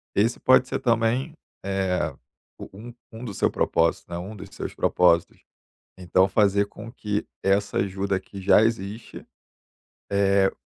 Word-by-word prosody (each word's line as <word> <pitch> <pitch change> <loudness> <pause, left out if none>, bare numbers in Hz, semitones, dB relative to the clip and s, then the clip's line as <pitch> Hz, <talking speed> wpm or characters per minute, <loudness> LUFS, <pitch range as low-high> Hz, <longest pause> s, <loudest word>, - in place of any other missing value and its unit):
esse 115 +4 +1
pode 130 0 +4
ser - - -3
também, 120 +5 0 0.3
eh, 95 -2 -1 0.5
o - - -9
um 120 +3 -10 0.2
um 115 +2 -9
do 105 - -6
seu - - +1
propósito, 85 +4 0
né, 85 - -4
um 95 +5 -7
dos 105 - -10
seus - - -5
propósitos, 85 -2 +2 0.5
então 95 +1 +2
fazer 100 0 +2
com 110 +3 -11
que 105 -4 -3 0.2
essa 100 +1 +1
ajuda 95 0 -1
que 95 +1 -11
já 100 +2 +5
existe, 110 -1 -3 0.9
eh, 100 -1 +3
100 Hz, 145 wpm, -24 LUFS, 95-115 Hz, 0.9 s, já